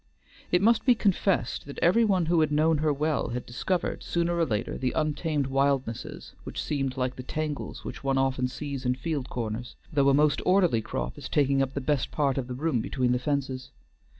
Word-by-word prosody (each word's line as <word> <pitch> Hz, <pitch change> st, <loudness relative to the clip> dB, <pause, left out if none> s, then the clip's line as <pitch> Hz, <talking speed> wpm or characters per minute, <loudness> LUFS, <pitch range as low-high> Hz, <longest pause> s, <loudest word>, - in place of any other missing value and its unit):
It 180 Hz, +2 st, +3 dB
must 230 Hz, +1 st, +4 dB
be 250 Hz, -2 st, +5 dB
confessed 195 Hz, -, 0 dB
that 140 Hz, -, -8 dB
every 205 Hz, +8 st, +4 dB
one 190 Hz, -6 st, +2 dB
who 170 Hz, +1 st, +2 dB
had 155 Hz, -1 st, +2 dB
known 155 Hz, +1 st, +3 dB
her 155 Hz, 0 st, +2 dB
well 150 Hz, +1 st, 0 dB
had 125 Hz, +1 st, -4 dB
discovered 175 Hz, +9 st, -2 dB
sooner 170 Hz, 0 st, 0 dB
or 170 Hz, -1 st, +1 dB
later 110 Hz, -1 st, -2 dB
the 130 Hz, -1 st, -1 dB
untamed 150 Hz, -1 st, 0 dB
wildnesses 135 Hz, -3 st, -1 dB
which -, -, -6 dB
seemed 135 Hz, -3 st, -2 dB
like 125 Hz, 0 st, -1 dB
the -, -, -5 dB
tangles 150 Hz, +2 st, -4 dB
which -, -, -7 dB
one 135 Hz, -1 st, +1 dB
often 135 Hz, -1 st, +1 dB
sees 140 Hz, 0 st, -5 dB
in 125 Hz, 0 st, +1 dB
field 140 Hz, -1 st, -3 dB
corners, 115 Hz, 0 st, -4 dB, 0.2 s
though 140 Hz, -2 st, +4 dB
a -, -, +4 dB
most 150 Hz, 0 st, +3 dB
orderly 180 Hz, -, +3 dB
crop -, -, -4 dB
is -, -, -7 dB
taking 140 Hz, -2 st, +2 dB
up 135 Hz, 0 st, -1 dB
the 140 Hz, -, -1 dB
best 140 Hz, 0 st, 0 dB
part 140 Hz, -3 st, 0 dB
of 125 Hz, -, -4 dB
the 125 Hz, -, -5 dB
room 140 Hz, -3 st, 0 dB
between 125 Hz, +1 st, 0 dB
the 125 Hz, -, +2 dB
fences. 130 Hz, -1 st, -2 dB
140 Hz, 205 wpm, -27 LUFS, 130-160 Hz, 0.2 s, be